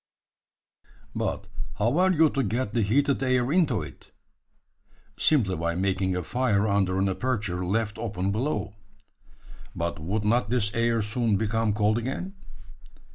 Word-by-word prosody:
"But 100 - -2 0.3
how 120 +10 +1
are 185 +1 +4
you 160 -3 +4
to 140 - 0
get 115 0 -2
the 120 - +2
heated 135 +7 +2
air 130 -1 +1
into 155 -9 +2
it?" - - -12 1.1
"Simply 110 -12 +2
by 85 +1 -2
making 95 0 0
a 90 - -2
fire 110 0 +1
under 95 -2 +1
an 95 +1 +2
aperture 100 -3 -2
left 110 +4 -1
open 100 -4 -2
below." 105 -3 -2 1.0
"But 85 -1 -3
would 100 +7 -2
not 110 0 +2
this 110 -4 0
air 115 -1 +1
soon 110 -1 0
become 110 0 0
cold 105 +2 +2
again?" 135 +11 -4
110 Hz, 140 wpm, -26 LUFS, 100-125 Hz, 1.1 s, are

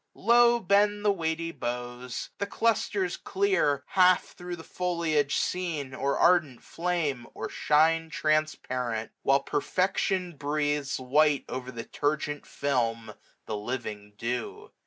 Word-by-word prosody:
Low 240 +2 +5
bend 205 +1 +2
the 205 - +5
weighty 165 -2 -2
boughs. 125 -1 -5
The 200 - -1
clusters 205 -4 0
clear. 380 - +1
Half 185 -1 +4
thro* 180 -1 -6
the 165 - -11
foliage 165 -6 0
seen, 160 -7 -2
or 140 +2 -1
ardent 165 -8 +3
flame. 165 -8 -2
Or - - -4
shine 160 +2 +2
transparent; 130 -8 -1
while 135 +1 +3
perfection 180 +2 0
breathes 145 -1 -1
690 130 0 -6
White 150 -2 +4
o'er 130 0 -5
the 115 -2 -6
turgent 145 +2 -2
film 115 -5 -1 0.3
the 110 - -3
living 105 -2 -5
dew. 115 +1 -4
150 Hz, 125 wpm, -28 LUFS, 130-180 Hz, 0.3 s, Low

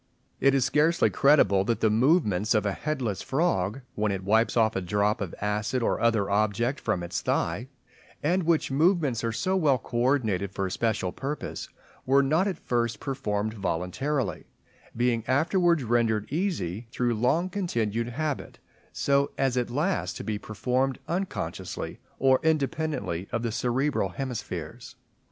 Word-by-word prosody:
It 135 0 +4
is 130 -2 +3
scarcely 155 +5 +3
credible 100 -10 +4
that 115 +1 0
the 110 - +3
movements 110 - +3
of 105 - +2
a 100 - +1
headless 125 -5 -2
frog, 135 - 0
when 105 -1 0
it 95 -1 -3
wipes 110 +5 +2
off 110 -1 +3
a 95 - 0
drop 105 +4 0
of 95 -4 -4
acid 105 +4 -1
or - - 0
other 115 -4 +2
object 110 +6 +1
from 100 -6 -1
its 85 - -3
thigh, 95 +10 -1 0.6
and 175 +5 +2
which 165 -4 +1
movements 150 - +2
are 115 - 0
so 185 - 0
well 150 -8 +3
coordinated 120 -5 0
for 100 - -2
a 95 - -3
special 110 -4 0
purpose, 140 +8 -5 0.4
were 135 +1 +5
not 160 +8 +2
at 190 -5 -2
first 120 -5 -1
performed 110 -6 -2
voluntarily, 105 - -2 0.5
being 120 -2 +1
afterwards 170 +3 +2
rendered 115 -2 +1
easy 120 - -2
through 120 -1 0
long 130 +11 +1
continued 115 - -1
habit 150 +3 -3 0.3
so 140 0 +1
as 135 -2 +1
at 125 -1 0
last 155 +10 -1
to - - -6
be 105 -2 -3
performed 125 +6 -1
unconsciously, 160 - -4 0.2
or 130 0 +4
independently 150 - -1
of 115 -1 -1
the 115 - -1
cerebral 125 0 0
hemispheres. 125 +3 -6
120 Hz, 150 wpm, -27 LUFS, 105-145 Hz, 0.6 s, were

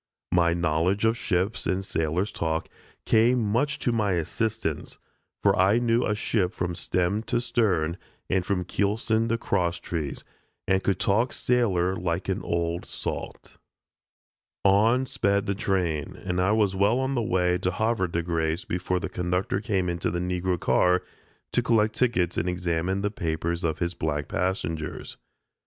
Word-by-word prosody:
My 85 -1 +3
knowledge 85 +5 +1
of 110 +1 +3
ships 100 +2 -1
and 95 +1 0
sailor's 80 +4 -1
talk 80 0 -2 0.4
came 120 +3 +4
much 120 +7 +1
to 120 - 0
my 105 -4 +1
assistance, 95 0 -2 0.5
for - - +4
I 95 +4 +4
knew 120 0 +2
a 105 - 0
ship 105 -3 0
from 90 -1 -2
stem 90 +4 0
to 120 - 0
stern, 100 -9 +1 0.3
and 95 -1 +1
from 90 -1 -1
keelson 110 +4 0
to 115 - +1
cross 90 -6 0
trees, 80 -5 -4 0.4
and 95 0 +2
could 95 -2 +1
talk 115 +6 +2
sailor 95 -7 +1
like 85 +1 -2
an 95 - 0
"old 85 0 -1
salt." - - -6 1.1
On 110 +6 +4
sped 100 -5 +1
the 100 - 0
train, 90 -7 -1
and 90 -1 -2
I 95 +3 +3
was 105 -3 +2
well 100 +5 +3
on 130 +1 0
the 120 - +1
way 90 -5 +1
to 90 - 0
Havre 110 0 0
de 85 0 -2
Grace 80 0 -1
before 90 +1 -1
the - - -3
conductor 90 +2 -1
came 95 -5 0
into 85 -1 -1
the 85 - -2
Negro 90 0 -1
car 90 +2 +3 0.5
to - - +3
collect 110 -3 +2
tickets 100 -9 +1
and 90 - 0
examine 90 +2 -1
the 105 0 -1
papers 85 -2 -2
of 80 -2 0
his 85 +1 -1
black 75 -3 -2
passengers. 80 -4 -3
95 Hz, 160 wpm, -26 LUFS, 85-110 Hz, 1.1 s, came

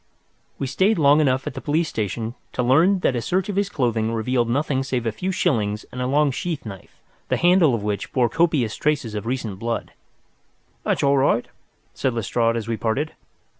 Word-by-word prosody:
We 140 - -2
stayed 190 +11 +2
long 145 0 +5
enough 130 -2 +1
at - - -4
the - - -7
police 155 +3 0
station 110 - -3 0.2
to 125 - 0
learn 165 +10 +4
that 130 - +1
a 120 - -1
search 185 - -1
of 205 - -2
his 200 0 +1
clothing 115 - 0
revealed 120 +1 0
nothing 135 +1 0
save 130 -3 -2
a 115 - +1
few 185 - -3
shillings 110 - 0
and 125 - -5
a 125 - 0
long 145 +2 +3
sheath 155 +1 -4
knife, 95 -4 -10 0.3
the - - +1
handle 175 -7 +4
of 105 - -4
which 105 -2 -3
bore 125 -2 +2
copious 140 -5 +1
traces 145 -7 -1
of 105 +1 -4
recent 115 -6 -3
blood. 115 +1 -3 0.9
"That's - - -1
all 140 0 +4
right," 135 -3 +2 0.5
said 130 -3 -1
Lestrade, 115 +1 +1
as 115 -1 -4
we 115 -1 -1
parted. 130 +9 -1
130 Hz, 200 wpm, -22 LUFS, 115-150 Hz, 0.9 s, long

